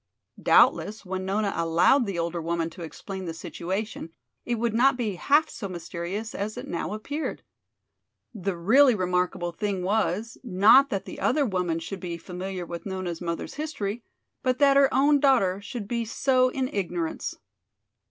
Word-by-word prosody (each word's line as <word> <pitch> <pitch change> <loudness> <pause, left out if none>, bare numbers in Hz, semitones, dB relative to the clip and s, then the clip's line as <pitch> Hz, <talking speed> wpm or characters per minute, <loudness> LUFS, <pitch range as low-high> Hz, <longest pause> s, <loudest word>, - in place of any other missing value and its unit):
Doubtless 215 0 +4
when 185 0 -4
Nona 200 +1 0
allowed 170 +10 +3
the 195 -3 -3
older 170 0 -2
woman 165 0 -2
to 180 - -11
explain 190 +3 -7
the 165 -1 -5
situation 185 +2 -4 0.4
it 240 - 0
would 230 0 -1
not 255 +3 +4
be 225 -5 -1
half 290 - +3
so 200 -9 -7
mysterious 180 +5 -5
as 210 +2 -4
it - - -6
now 175 +3 -3
appeared. 285 +9 -4 0.9
The 195 -4 -3
really 250 +8 +5
remarkable 180 -2 -1
thing 195 +1 -2
was, 210 +2 -1
not 230 +6 +6
that 195 -6 -3
the - - -8
other 285 +2 +2
woman 180 -6 -1
should 175 +4 -6
be 175 -2 -5
familiar 180 +1 -6
with 170 0 -7
Nona's 185 -3 -4
mother's 170 -1 -4
history, 240 -8 -4 0.4
but 255 -1 +1
that 280 0 +5
her 275 -1 +5
own 285 +2 +4
daughter 230 -9 +3
should 215 -1 -6
be 235 +1 -1
so 255 +3 +2
in 260 0 -2
ignorance. 175 -6 -3
200 Hz, 160 wpm, -26 LUFS, 175-240 Hz, 0.9 s, not